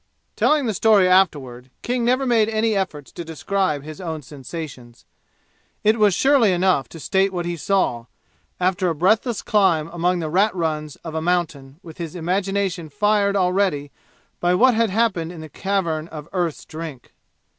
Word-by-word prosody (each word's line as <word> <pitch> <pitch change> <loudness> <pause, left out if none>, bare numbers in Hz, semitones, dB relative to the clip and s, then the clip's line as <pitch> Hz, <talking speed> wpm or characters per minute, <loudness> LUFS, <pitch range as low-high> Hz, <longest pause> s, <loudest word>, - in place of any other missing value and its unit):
Telling 300 -3 +2
the 220 - 0
story 205 -1 +4
afterward 140 -10 +1
King 245 0 -1
never 255 +3 +2
made 225 -3 +3
any 220 0 +1
effort 185 -7 -2
to 170 - -8
describe 165 -1 -2
his 155 +4 -9
own 160 -4 -5
sensations. 130 -3 -9 0.8
It 220 +2 +3
was 205 -4 +4
surely 265 -3 +4
enough 180 -8 +1
to 165 - -11
state 195 +4 +1
what 175 -2 -3
he 175 0 -2
saw, 150 -9 0 0.5
after 180 0 +1
a 165 - -2
breathless 215 - +1
climb 175 -8 +2
among 175 +1 0
the 165 -2 -3
rat 195 +4 +2
runs 155 -4 -2
of 160 - -6
a 160 - -2
mountain 160 -5 -2
with 165 -1 -12
his 170 0 -6
imagination 185 -1 -1
fired 205 +1 +1
already 180 -6 +1 0.5
by 175 +1 +2
what 255 +6 +5
had 230 0 +2
happened 190 -6 0
in 170 -3 -9
the 155 - -9
Cavern 170 -4 -2
of 155 -2 -9
Earth's 175 -4 -2
Drink. 155 -5 -9
180 Hz, 165 wpm, -22 LUFS, 155-200 Hz, 0.8 s, what